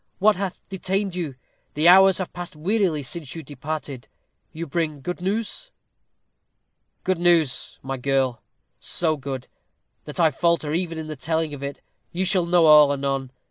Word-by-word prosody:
"What 210 +2 +4
hath 190 -1 -4
detained 190 0 -2
you? 165 -7 -4 0.4
The 155 +3 +3
hours 190 +1 +8
have 185 - -4
passed 175 -2 -7
wearily 175 -2 0
since 150 +1 -5
you 165 - -6
departed. 145 -2 -6 0.4
You 165 +2 -5
bring 155 -2 -2
good 180 +5 -5
news?" 220 - -3 1.3
"Good 185 -2 0
news, 165 -7 +2
my 135 0 -3
girl; 130 -2 0 0.4
so 160 -2 0
good, 135 -2 -6 0.6
that 150 - -6
I 160 -2 +5
falter 165 0 +1
even 170 -1 -1
in 160 - -5
the 155 0 -6
telling 160 +1 -1
of 140 - -7
it. 140 0 -6 0.3
You 185 +2 -1
shall 185 -2 +1
know 175 -1 +4
all 150 -2 +8
anon. 135 -1 -2
160 Hz, 160 wpm, -23 LUFS, 140-180 Hz, 1.3 s, hours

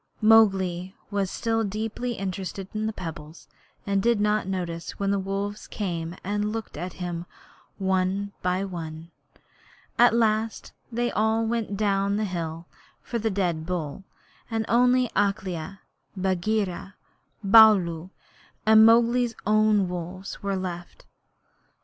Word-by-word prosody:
Mowgli 190 -5 +4 0.2
was 200 -2 0
still 225 +2 -1
deeply 220 +4 -3
interested 195 -1 -5
in 215 0 -1
the - - -1
pebbles, 165 -5 -8 0.4
and 195 -1 0
he 235 - +3
did 235 -3 +2
not 210 -1 +1
notice 175 -3 -4
when 200 0 0
the 200 - +1
wolves 200 +2 -4
came 170 -4 -4
and 205 +2 -1
looked 225 -1 -5
at 175 +3 -5
him 175 -1 -5 0.5
one 190 +1 0
by 180 +2 0
one. 165 -3 -7 0.9
At 240 -1 +6
last 220 -1 0 0.2
they 240 +1 -1
all 220 +1 +1
went 225 -3 -2
down 200 -1 +1
the 215 +1 0
hill 165 -3 -4 0.4
for 235 - -3
the 225 +1 0
dead 175 -5 -1
bull, 175 -2 -4 0.5
and 225 -1 -1
only 250 +1 +4
Akela, 195 -2 -1 0.4
Bagheera, 190 +1 -1 0.5
Baloo, 195 -5 +6 0.6
and 220 0 +7
Mowgli's 235 +1 +4
own 215 -2 +3
wolves 180 +2 -6
were 200 -1 -1
left. 175 -2 -6
195 Hz, 130 wpm, -25 LUFS, 180-220 Hz, 0.9 s, and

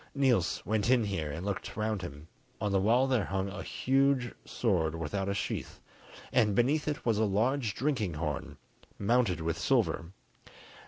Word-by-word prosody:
Niels 130 -10 +2
went 110 +1 0
in 125 -3 +5
here 95 -7 -2
and 80 +6 -5
looked 100 0 -4
round 110 -2 -1
him: 75 -3 -8 0.3
on 105 -1 -1
the 95 -1 +3
wall 120 +6 +4
there 130 -6 +1
hung 95 0 -2
a 95 0 -6
huge 135 -2 +1
sword 85 -9 0
without 95 +5 -2
a 100 - -1
sheath, - - -4 0.5
and 105 -2 +3
beneath 145 +8 +2
it 150 -1 -2
was 115 -3 +2
a - - +3
large 110 +3 +1
drinking 120 - -1
horn, 75 -2 -4 0.4
mounted 105 -5 +2
with 80 0 -2
silver. - - +1
105 Hz, 165 wpm, -30 LUFS, 90-125 Hz, 0.5 s, in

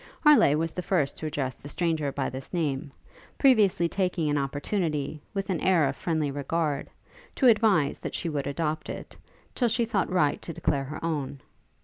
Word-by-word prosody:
Harleigh 295 - +6
was 165 0 -1
the 180 - -3
first 170 -7 0
to 155 - -5
address 140 -4 -2
the 145 - -12
stranger 160 -3 0
by 135 -1 -2
this 130 +1 -7
name, 150 -4 -2 0.5
previously 210 -10 +4
taking 175 -4 0
an 145 - +1
opportunity, 150 +1 -2
with 195 0 -2
an 175 - 0
air 175 -6 +4
of 135 - -2
friendly 155 -3 -1
regard, 145 +1 -2 0.5
to 265 - +1
advise 210 - +4
that - - -5
she - - -3
would 145 -3 -2
adopt 155 +1 -2
it, - - -7 0.4
till 245 - +1
she 235 +1 +1
thought 215 -3 0
right 155 -6 +2
to 165 - -6
declare 140 -2 0
her 150 +4 -6
own. 145 -4 -2
155 Hz, 185 wpm, -27 LUFS, 140-180 Hz, 0.5 s, Harleigh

